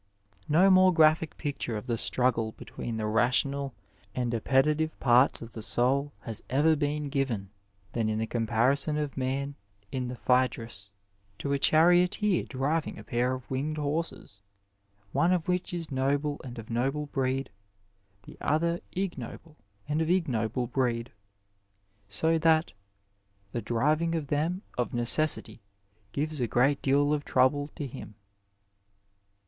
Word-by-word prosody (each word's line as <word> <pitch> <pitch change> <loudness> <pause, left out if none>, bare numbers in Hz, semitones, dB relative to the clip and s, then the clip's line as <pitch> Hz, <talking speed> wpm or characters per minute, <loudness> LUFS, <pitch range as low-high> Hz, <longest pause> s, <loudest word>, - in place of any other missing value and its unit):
^ 95 - -29
No 180 +6 +5
more 185 0 +6
graphic 160 -1 +3
picture 140 -6 -3
of 105 - -7
the 120 -2 -1
struggle 115 -2 0
between 115 -2 -6
the 110 - -2
rational 130 +5 +1 0.4
and 120 -1 -1
appetitive 150 +7 +1
parts 125 0 +4
of 115 - -10
the 110 - -7
soul 135 +6 +3
has 115 -3 -3
ever 150 +5 +3
been 150 0 -1
given 130 -9 -2 0.4
than 115 -2 0
in 110 - -1
the 110 - -1
comparison 120 +7 +1
of 150 -2 -3
man 135 +2 -2 0.4
in 130 -2 -2
the 125 - -5
Phcedrus 115 -6 0 0.5
to 140 +6 -2
a 140 - 0
charioteer 175 +6 +3
driving 145 +4 -2
a - - -9
pair 125 +1 0
of 130 -1 -10
winged 145 +4 -2
horses, 150 -8 -3 0.7
one 170 +1 +2
of 180 -2 0
which 180 0 -1
is 170 -3 -5
noble 140 +2 0
and 125 -2 -8
of 115 0 -8
noble 135 +6 -1
breed; 135 -1 -2 0.7
the - - -14
other 170 +3 +1
ignoble 165 -4 -5 0.3
and 150 +2 0
of 160 - -1
ignoble 125 - 0
breed, 120 -1 -1 1.0
so 160 +11 +1
that 160 0 +3 0.4
" 100 0 -41
the 120 - -3
driving 150 +10 +1
of 150 -4 -3
them 165 +7 -1 0.2
of 125 - -1
necessity 120 -2 +3 0.5
gives 150 +2 -2
a 120 - +1
great 135 +5 +2
deal 145 +2 +2
of 145 -1 -1
trouble 145 +3 +2
to 145 - -4
him." 130 -5 -9
135 Hz, 145 wpm, -28 LUFS, 120-155 Hz, 1.0 s, more